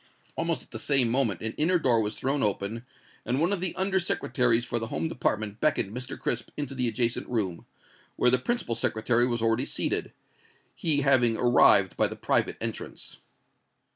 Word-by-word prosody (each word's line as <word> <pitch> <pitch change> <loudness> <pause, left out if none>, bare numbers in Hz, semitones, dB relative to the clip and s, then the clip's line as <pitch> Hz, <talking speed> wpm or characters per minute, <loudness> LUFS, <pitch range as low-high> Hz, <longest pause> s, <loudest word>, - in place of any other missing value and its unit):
Almost - - -2
at - - -24
the - - -6
same 135 -5 +2
moment 115 -7 0
an 110 0 -4
inner 175 +4 +3
door 125 -8 +2
was 105 0 -3
thrown 135 +2 -1
open, 105 +3 -1 0.4
and 125 +3 -1
one 170 +5 +2
of 190 - -2
the 180 -2 -2
Under 190 +1 +1
Secretaries 125 -9 +1
for 120 - -2
the 115 - -4
Home 160 - -2
Department 110 -8 -2
beckoned 130 -8 0
Mr. 125 +1 -6
Crisp 120 - -2
into 145 -2 -4
the 125 -2 0
adjacent 115 +1 0
room, 100 -8 -2 0.5
where 125 - +3
the 130 - +5
principal 240 - -2
Secretary 120 +1 +1
was 120 -2 -2
already 115 +2 +2
seated, - - -1 0.6
he 150 -4 +1
having 120 -5 +3
arrived 120 -1 +4
by - - +3
the - - -7
private - - 0
entrance. - - -6
125 Hz, 180 wpm, -27 LUFS, 115-145 Hz, 0.6 s, the